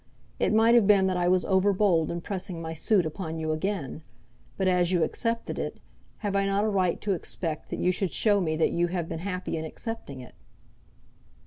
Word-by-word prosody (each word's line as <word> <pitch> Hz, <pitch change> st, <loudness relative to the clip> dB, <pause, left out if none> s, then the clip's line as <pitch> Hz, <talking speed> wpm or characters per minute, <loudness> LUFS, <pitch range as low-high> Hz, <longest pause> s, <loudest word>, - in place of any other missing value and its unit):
It -, -, +2 dB
might 225 Hz, +2 st, +5 dB
have 235 Hz, -4 st, +5 dB
been 200 Hz, -2 st, +5 dB
that 190 Hz, -1 st, +1 dB
I 175 Hz, 0 st, +1 dB
was 185 Hz, 0 st, +3 dB
over 190 Hz, +1 st, +3 dB
bold 185 Hz, -5 st, +2 dB
in 170 Hz, 0 st, -3 dB
pressing 185 Hz, -2 st, -4 dB
my 160 Hz, 0 st, -5 dB
suit 180 Hz, +3 st, +2 dB
upon 160 Hz, +1 st, -4 dB
you 160 Hz, -1 st, -2 dB
again; 155 Hz, -3 st, -3 dB, 0.6 s
but 190 Hz, -, +1 dB
as 180 Hz, -1 st, +2 dB
you 175 Hz, -3 st, +3 dB
accepted 230 Hz, +5 st, -2 dB
it, -, -, -4 dB, 0.5 s
have 200 Hz, -1 st, -1 dB
I 195 Hz, 0 st, +2 dB
not 195 Hz, +1 st, +1 dB
a 215 Hz, -, +1 dB
right 185 Hz, -4 st, +1 dB
to 205 Hz, -, 0 dB
expect 165 Hz, -2 st, -4 dB
that -, -, -4 dB
you 180 Hz, -, +2 dB
should 185 Hz, -1 st, -1 dB
show 205 Hz, -2 st, +3 dB
me 155 Hz, -3 st, 0 dB
that 160 Hz, -, +2 dB
you 175 Hz, 0 st, +1 dB
have 175 Hz, -2 st, -3 dB
been 165 Hz, -1 st, -5 dB
happy 180 Hz, -1 st, -3 dB
in 160 Hz, -, -3 dB
accepting 160 Hz, -, -6 dB
it?" 125 Hz, -, -11 dB
180 Hz, 215 wpm, -27 LUFS, 165-200 Hz, 0.6 s, might